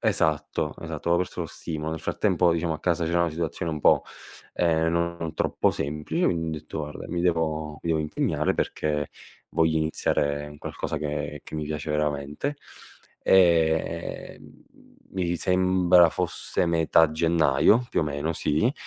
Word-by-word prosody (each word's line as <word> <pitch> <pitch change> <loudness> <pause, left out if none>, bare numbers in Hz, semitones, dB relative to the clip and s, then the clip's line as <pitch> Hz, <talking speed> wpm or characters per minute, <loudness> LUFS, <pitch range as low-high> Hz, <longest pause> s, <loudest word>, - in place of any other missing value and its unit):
Esatto, 80 0 0
esatto, - - -5
avevo 85 +1 +3
perso 90 - -8
lo 85 - -2
stimolo. 80 -1 -5
Nel 80 - -3
frattempo 90 -2 +2
diciamo 85 0 -1
a 80 - -4
casa 85 -2 0
c'era 85 +1 +1
una 85 - 0
situazione 80 +1 -3
un 75 - -4
po', - - +4 0.5
ehm, 80 -1 +2
non 85 -1 -2
troppo - - +1
semplice 75 - -2
quindi 80 -2 0
ho - - -13
detto: 80 - -7
"Guarda 75 -1 -6
mi 85 - -2
devo 80 -3 0
mi - - -4
devo 80 - +2
impegnare 75 0 0
perché 75 -1 -1 0.4
voglio 80 0 +2
iniziare 75 -2 0
un 75 0 -11
qualcosa - - -4
che 75 -1 -4
che - - -10
mi 75 - -3
piace 75 0 -4
veramente". 75 - -2 0.6
E, 85 -2 +2
ehm, - - -17 0.5
mi 90 -2 0
sembra 90 -1 +4
fosse 90 0 -1
metà 80 -1 +4
gennaio, 80 - +3
più - - 0
o - - +1
meno 75 +2 -2
sì, 75 - +1
80 Hz, 160 wpm, -26 LUFS, 75-85 Hz, 0.6 s, po